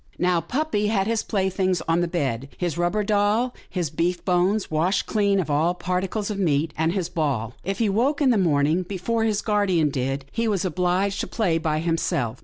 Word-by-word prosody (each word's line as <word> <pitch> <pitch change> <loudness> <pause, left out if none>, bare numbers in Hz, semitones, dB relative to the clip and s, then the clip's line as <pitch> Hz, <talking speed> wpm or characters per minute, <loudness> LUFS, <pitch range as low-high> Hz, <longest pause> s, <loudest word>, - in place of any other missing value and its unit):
Now, 180 -1 +2
puppy 240 - -1
had 200 -3 +1
his 225 0 0
playthings 190 -2 0
on 165 +1 +2
the 175 - +1
bed 135 -7 -2
— - - -24
his 175 -4 -2
rubber 175 +5 0
doll, 210 +4 +1 0.2
his 175 -6 -2
beef 175 +3 -1
bones 185 +3 +1
washed 175 +6 +1
clean 200 -2 +1
of 160 -5 -2
all 160 +5 +2
particles 190 +4 -2
of 200 - -4
meat, 155 -3 +1
and 160 +1 +1
his 190 -4 -1
ball. 140 -9 -2
If 195 +1 -2
he 225 - +1
woke 245 +9 +1
in 275 -4 +4
the 230 - +3
morning 155 -1 +2
before 200 +5 -2
his 215 -2 0
guardian 195 -8 +2
did, 135 +1 -2
he 230 0 -1
was 200 -3 0
obliged 185 +3 0
to - - -2
play 180 -8 0
by 155 -1 -1
himself. 145 -8 -1
180 Hz, 205 wpm, -24 LUFS, 165-205 Hz, 0.2 s, in